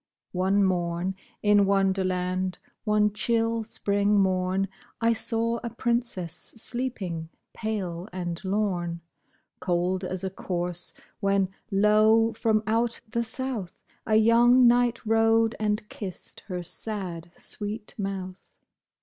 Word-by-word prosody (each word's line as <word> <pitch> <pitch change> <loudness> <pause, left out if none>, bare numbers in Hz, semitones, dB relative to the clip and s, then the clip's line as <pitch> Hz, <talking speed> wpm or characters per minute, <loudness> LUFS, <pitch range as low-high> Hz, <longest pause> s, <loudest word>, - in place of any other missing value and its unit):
One 190 +2 +2
morn, 175 0 0 0.3
in 205 -1 +5
Wonderland 185 -1 +1
— - - -47
one 210 -1 +3
chill 230 +1 +1
spring 205 -1 +1
morn 190 0 +1 0.2
— - - -32
I 230 0 +3
saw 230 +1 0
a 235 - -2
princess 235 -7 -1
sleeping, 215 -8 -4 0.2
pale 195 -5 -3
and 175 -1 -4
lorn. 185 -4 -1 0.6
Cold 180 +1 0
as 185 0 -3
a 190 - -2
corse; 175 -2 -2 0.3
when, 195 -2 +2 0.2
lo! 215 +2 +4
from 220 -1 +1
out 230 +2 +1
the 235 +2 0
south 230 -5 -4 0.3
A 215 - +3
young 240 +3 +6
knight 240 -1 +3
rode, 225 +1 +3
and 210 0 0
kissed 190 -5 -7
her 180 -3 -4
sad, 175 -3 -4
sweet 210 +1 -5
mouth. 190 -2 -5
200 Hz, 120 wpm, -27 LUFS, 185-225 Hz, 0.6 s, young